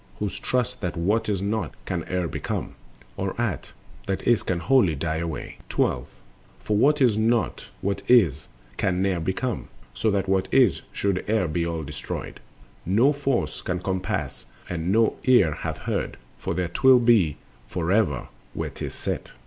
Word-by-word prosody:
Who 105 - -1
trust 125 +3 -2
that 90 -3 -3
what 105 +6 +1
is 100 -2 0
not 100 -4 -2
can - - -2
e'er 90 -1 0
become, - - -4 0.4
Or - - -3
aught - - -2 0.4
that 95 - -1
is 120 -2 +4
can 90 -2 -1
wholly 115 - +3
die 80 +2 -2
away. 80 -2 -5
12. - - 0 0.5
From 105 -1 0
what 150 +5 +4
is 110 -4 +3
not 115 +1 +1
what 100 0 -1
is 90 - +4 0.3
can 90 0 +1
ne'er 95 -3 +1
become; 95 +9 -2 0.3
So 110 - 0
that 100 -1 0
what 95 0 +2
is 125 -9 +4
should 100 -2 -1
e'er 110 -5 +2
be 85 +2 -1
all 85 -1 -3
destroyed, 75 +1 -6 0.4
No 115 - +4
force 140 -3 -1
could 90 0 -3
compass 95 -8 -3 0.2
and 85 0 -2
no 110 +2 +3
ear 120 -11 +5
hath - - -4
heard— - - -3 0.2
For - - -3
there 90 -2 -1
'twill 130 +8 +6
be 115 - +4 0.3
forever 90 - 0 0.3
where - - -3
'tis - - -6
set. - - -4
95 Hz, 165 wpm, -25 LUFS, 85-115 Hz, 0.5 s, twill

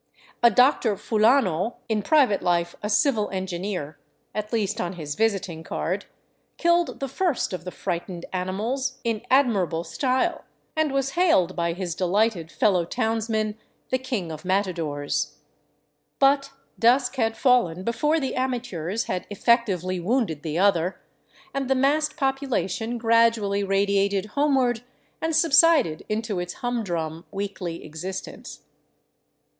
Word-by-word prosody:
A 235 - +7
Dr. 245 -1 +3
Fulano, 215 - +2
in 220 -2 0
private 260 -4 +3
life 175 -1 0
a 210 - -3
civil 220 -1 +2
engineer, 185 -4 -4 0.3
at 215 0 -4
least 220 -1 -1
on 175 +1 -3
his 155 -5 -5
visiting 195 -4 -1
card, - - -3 0.5
killed 345 0 +2
the 275 - -2
first 285 - -1
of 180 -1 -5
the - - -3
frightened 175 -1 -4
animals 225 +9 -2
in 230 -3 -1
admirable 200 - +2
style, 260 - 0 0.3
and 315 -2 +1
was 275 0 0
hailed 235 - +3
by 170 -1 0
his 180 -1 -4
delighted 185 -1 0
fellow 185 -5 +2
townsmen 220 +1 -1 0.3
the 255 - +2
king 240 -10 -3
of 155 -1 -8
matadores. 175 -7 -1 0.8
But 275 0 +3 0.3
dusk 250 +3 +3
had 225 -2 0
fallen 210 -10 +2
before 300 +9 +1
the 270 -3 -2
amateurs 230 -7 -2
had 180 -1 -4
effectively 200 -5 +1
wounded 190 - 0
the 160 0 -3
other, 185 -2 +2 0.5
and 275 -1 -2
the 265 - +3
massed 295 +3 +1
population 250 - -1
gradually 230 -3 +3
radiated 200 0 +1
homeward 265 -5 +2 0.4
and 320 0 0
subsided 320 - +4
into 215 -2 -2
its 175 0 -4
humdrum 175 -10 -3
weekly 195 -4 -5
existence. 160 +5 -7
210 Hz, 130 wpm, -25 LUFS, 180-255 Hz, 0.8 s, A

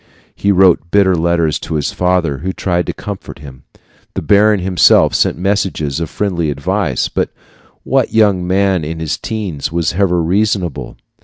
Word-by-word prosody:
He 100 - 0
wrote 90 -3 +3
bitter 100 0 +3
letters 85 -2 0
to 80 - -5
his 75 -2 -1
father, 90 -6 0
who 95 +5 -3
tried 90 -2 -1
to - - -1
comfort 100 -2 -8
him. 70 -3 -13 0.5
The - - -3
baron 105 0 +4
himself 90 -2 +4
sent - - +1
messages 90 -6 -1
of 85 -3 -3
friendly 90 -6 -2
advice, 80 0 -1
but - - -2 0.5
what - - 0
young 100 -5 +2
man 95 -2 +1
in 80 +2 -5
his 80 -2 -2
teens 95 -11 -4
was 85 0 -1
ever 90 -1 +1
reasonable? 95 -2 -1
90 Hz, 160 wpm, -15 LUFS, 80-100 Hz, 0.5 s, baron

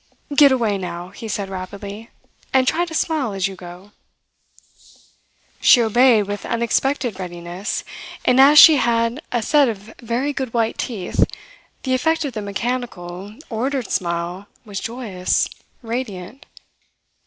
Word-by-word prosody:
"Get 285 -1 +7
away 225 -6 +1
now," 180 -1 -6
he 200 +4 -9
said 200 -1 -3
rapidly, 200 +3 -7 0.4
"and 260 -1 +3
try 345 +6 +2
to 335 - -9
smile 300 -10 0
as 195 -1 0
you 195 - -8
go." 180 +2 -12 1.7
She - - +7
obeyed 235 0 +4
with 205 0 -5
unexpected 235 -1 0
readiness; 175 +2 -5 0.4
and 250 +1 +5
as 290 +2 +7
she 310 0 +10
had 235 +2 +1
a 240 -2 0
set 290 -1 +4
of 215 0 -7
very 245 +5 -1
good 260 -4 -4
white 230 -1 0
teeth, 210 -8 -1 0.6
the 260 - 0
effect 320 +4 +1
of 275 - -4
the 215 - -4
mechanical, 200 -3 -4 0.2
ordered 250 +1 -2
smile 175 +2 -2 0.2
was 200 -3 -5
joyous, 225 -6 -1 0.4
radiant. 225 -1 -6
225 Hz, 135 wpm, -21 LUFS, 195-255 Hz, 1.7 s, she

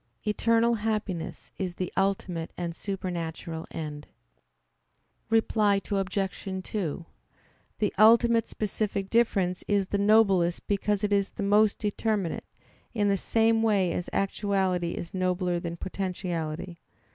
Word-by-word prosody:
Eternal 230 +2 +3
happiness 210 -6 -3
is 185 -3 -3
the 180 -1 -4
ultimate 190 -4 -1
and 170 -2 -3
supernatural 170 -4 -4
end. 150 -2 -6 1.2
Reply 215 -2 +3
Obj. 195 -1 -1 0.2
2: 175 -5 -3 0.7
The 210 - 0
ultimate 230 +1 +6
specific 205 -2 -3
difference 195 -6 +2
is 200 -2 +1
the 200 - 0
noblest 200 -5 +3
because 205 0 0
it 205 0 +1
is 200 -1 +2
the - - -5
most 210 +1 +4
determinate, 210 -3 -1 0.5
in 205 -2 +2
the 200 - +3
same 225 +3 +2
way 200 -5 +2
as 175 - -3
actuality 190 -3 0
is 170 - -6
nobler 180 -1 0
than 170 0 -5
potentiality. 175 -3 -4
195 Hz, 120 wpm, -28 LUFS, 175-210 Hz, 1.2 s, ultimate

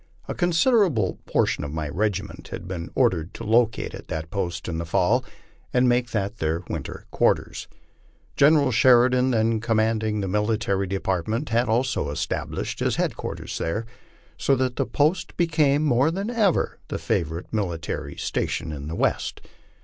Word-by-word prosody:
A - - -2
considerable 175 - +2
portion - - +1
of 75 - -5
my 80 0 -3
regiment 100 +5 -2
had 85 - -7
been 85 -3 -5
ordered 80 +2 +1
to - - -7
locate 115 +1 +2
at - - -9
that 80 0 -5
post 85 -4 -3
in 80 -2 -3
the - - -2
fall, 100 +9 +2 0.5
and 125 0 +3
make 120 0 +2
that 105 -1 -2
their 80 +2 -1
winter - - -6
quarters. - - +1 0.7
General 145 -2 +5
Sheridan, 125 +2 +5
then 115 -2 +2
commanding 110 -1 +1
that 95 - -2
military 105 -1 0
(Apartment, 95 - -1
had 120 +1 +1
also 120 - +1
established 80 +3 -3
his - - +1
headquarters - - -3
there, 105 +8 -2 0.5
so 135 - +3
that 130 -1 -1
the - - 0
post 155 +5 0
be 175 - +3
came 150 -3 +2
more 135 0 +3
than 195 +7 -3
ever 215 -7 +1
the - - -3
favorite 80 +4 -2
military 85 -7 -3
station - - -2
in 70 -1 -6
the 80 - -4
West. - - 0
110 Hz, 155 wpm, -24 LUFS, 90-130 Hz, 0.7 s, General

